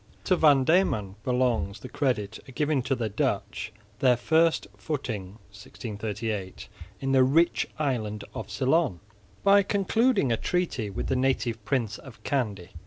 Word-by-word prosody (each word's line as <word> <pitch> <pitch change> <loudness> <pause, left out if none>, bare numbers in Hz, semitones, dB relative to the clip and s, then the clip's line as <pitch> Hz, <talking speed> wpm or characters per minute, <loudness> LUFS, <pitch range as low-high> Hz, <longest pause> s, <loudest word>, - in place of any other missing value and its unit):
To 185 - +3
Van 145 -5 +5
Diemen 130 - +2
belongs 120 -6 0
the - - -7
credit 110 -7 -1
of 130 - -13
giving 150 0 +1
to 135 +2 0
the 115 -3 -2
Dutch 105 0 -2 0.3
their 125 -2 +4
first 160 +6 +2
footing 110 - -4 0.2
(1638) 105 -1 -5 0.3
in 135 - -1
the 130 -1 +6
rich 160 +7 +3
island 110 -8 -2
of - - -6
Ceylon, 135 - +1 0.4
by 200 0 +6
concluding 200 - +2
a 115 - +2
treaty 165 - -1
with 95 - -4
the 130 - 0
native 130 -3 0
prince 120 -5 -1
of 130 -5 -14
Kandy. 105 -10 -2
130 Hz, 145 wpm, -27 LUFS, 105-150 Hz, 0.4 s, the